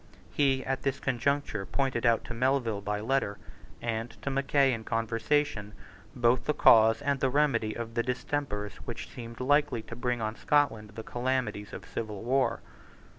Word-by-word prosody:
He 135 -2 +2
at 135 0 -1
this 135 -1 -1
conjuncture 135 -3 0
pointed 130 +1 0
out 115 -1 +3
to - - -7
Melville 120 -3 +1
by 105 +1 -2
letter, 110 -4 0 0.5
and 115 0 -2
to 140 - -1
Mackay 135 0 +3
in 115 -1 -4
conversation, 115 0 0 0.4
both 120 +1 +2
the 150 - +1
cause 110 0 +6
and 140 -1 +1
the 135 - +2
remedy 125 -6 +1
of 115 -1 -5
the 120 - +1
distempers 125 -4 -3
which 120 - -6
seemed 115 -3 -8
likely 145 -3 +2
to 115 - -8
bring 125 0 -1
on 110 0 -2
Scotland 115 -9 +1
the 110 - -6
calamities 120 -5 -2
of - - -8
civil 110 -2 -5
war. 130 +3 +1
120 Hz, 165 wpm, -29 LUFS, 110-135 Hz, 0.5 s, cause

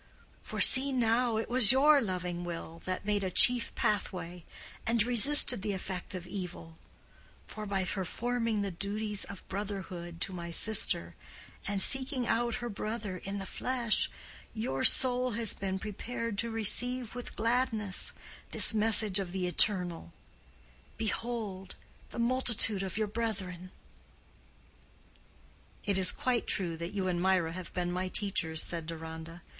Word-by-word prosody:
For - - -8
see, 270 +1 +8
now, 235 -2 -1
it 220 - -4
was 240 -3 +7
your 285 +2 +3
loving 180 -3 -6
will 165 -1 -9
that 185 +1 -6
made 205 -1 -2
a 190 - -3
chief 245 +4 +6
pathway, 180 -5 -4 0.4
and 230 -1 +1
resisted 245 0 +7
the 205 0 -4
effect 190 0 -6
of 180 -1 -8
evil; 180 -3 -9 0.7
for, 215 -1 -10
by 195 -2 -2
performing 225 +4 -4
the 200 - -5
duties 205 +3 -2
of 200 - -12
brotherhood 190 -4 -8
to 190 - -2
my 170 -1 -8
sister, 170 - +3 0.5
and 200 0 -4
seeking 265 -1 0
out 235 0 -2
her 240 - -6
brother 215 -2 -7
in 195 +3 -8
the 195 - -7
flesh, 240 +2 -1 0.5
your 135 - -4
soul 250 -1 +4
has 225 -1 0
been 190 -1 -5
prepared 225 +3 -7
to 235 - -2
receive 230 +2 +1
with 245 0 -10
gladness 225 -4 0 0.4
this - - +6
message 215 -2 +3
of 190 -3 -6
the 185 -1 -4
Eternal, 180 - 0 0.9
'behold 220 -4 -5 0.3
the - - -12
multitude 235 -4 +1
of 190 0 -6
your 215 - -1
brethren.'" 200 -5 -6 2.2
"It 200 -2 -1
is 185 - +5
quite 250 -2 -3
true 175 -4 -3
that 170 +4 -8
you 190 -2 -3
and 175 -1 -3
Mirah 185 -3 0
have 180 -1 -10
been 175 -1 -3
my 185 +1 -4
teachers," 185 -5 -1
said 165 -2 -1
Deronda. 160 +1 -10
200 Hz, 145 wpm, -28 LUFS, 180-230 Hz, 2.2 s, see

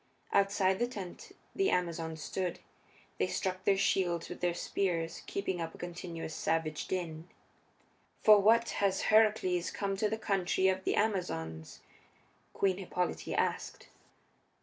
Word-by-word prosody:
Outside 195 -1 +3
the 240 - +2
tent 200 -8 -8 0.2
the 390 0 +2
Amazons 165 -3 -1
stood; 185 -2 -2 0.6
they - - +2
struck 185 -1 -2
their 195 -1 +4
shields 180 -4 +1
with - - -8
their 175 -1 +1
spears, 170 -4 -1
keeping 190 -3 -2
up 165 -1 -5
a - - -12
continuous 170 -2 -6
savage 155 -2 -1
din. 170 -2 -4 0.9
"For 215 -1 +8
what 230 +3 +4
has 195 -1 +2
Heracles 210 -5 +4
come 195 -1 -2
to 210 +1 +1
the 220 - -2
country 190 -3 +1
of 190 0 -1
the - - +1
Amazons?" 80 - -2 0.7
Queen 190 -2 +1
Hippolyte 180 -2 -2
asked. - - -2
185 Hz, 135 wpm, -32 LUFS, 170-200 Hz, 0.9 s, For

